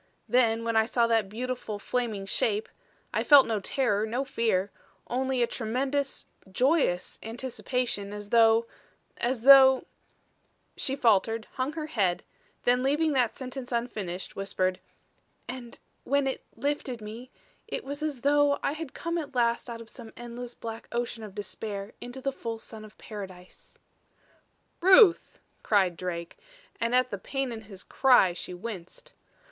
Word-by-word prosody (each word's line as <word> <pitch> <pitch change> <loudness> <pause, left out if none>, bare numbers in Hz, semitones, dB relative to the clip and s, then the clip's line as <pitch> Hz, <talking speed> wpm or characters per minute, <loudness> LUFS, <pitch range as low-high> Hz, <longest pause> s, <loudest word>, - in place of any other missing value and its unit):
Then, 230 -2 +3
when 230 0 -1
I 220 0 +5
saw 235 0 +2
that 225 -4 +2
beautiful, 240 -1 -4
flaming 220 -2 -2
Shape 210 +2 0 0.5
I - - +1
felt 285 -2 +8
no 220 -2 -1
terror, 210 -1 0
no 245 +5 -1
fear 205 -6 0 0.3
only 260 0 0
a - - +4
tremendous 265 +5 -2 0.3
joyous 255 - +1
anticipation, 240 -2 -3
as 205 0 -7
though 225 0 +5 0.5
as 245 0 -1
though 265 -1 +8 0.4
" - - -42
She 270 - -2
faltered, 225 -3 +2
hung 260 +3 -2
her 315 -1 -4
head, 195 - 0 0.4
then 245 +1 +3
leaving 295 +4 +2
that 250 -4 +2
sentence 255 -1 -6
unfinished, 210 -7 -3
whispered: 185 -2 -1 0.7
"and 245 -1 -7 0.3
when 280 +1 +1
it 265 - -2
lifted 280 -4 -2
me 225 +4 -9 0.4
it - - -4
was 285 +2 -6
as 300 -5 -3
though 290 +1 +4
I - - +1
had 310 -2 -7
come 335 0 -2
at 290 -4 -7
last 235 0 +1
out 230 -1 -6
of 230 - -11
some 230 -3 -11
endless 240 0 -7
black 225 0 -7
ocean 235 -1 -3
of 205 -2 -9
despair 205 0 -5
into 245 +2 -7
the 275 - -1
full 230 -3 -5
sun 220 -1 -10
of 215 0 -14
paradise." 190 -4 -10 1.0
"Ruth!" 375 +1 +6 0.2
cried 190 -5 +2
Drake, 170 -1 -5 0.4
and 230 +1 +1
at 255 0 +3
the 200 - -4
pain 270 +4 -3
in 225 -1 -6
his 200 -3 -11
cry 250 -9 +4
she 180 +1 -6
winced. 185 -3 -8
235 Hz, 150 wpm, -28 LUFS, 210-265 Hz, 1.0 s, felt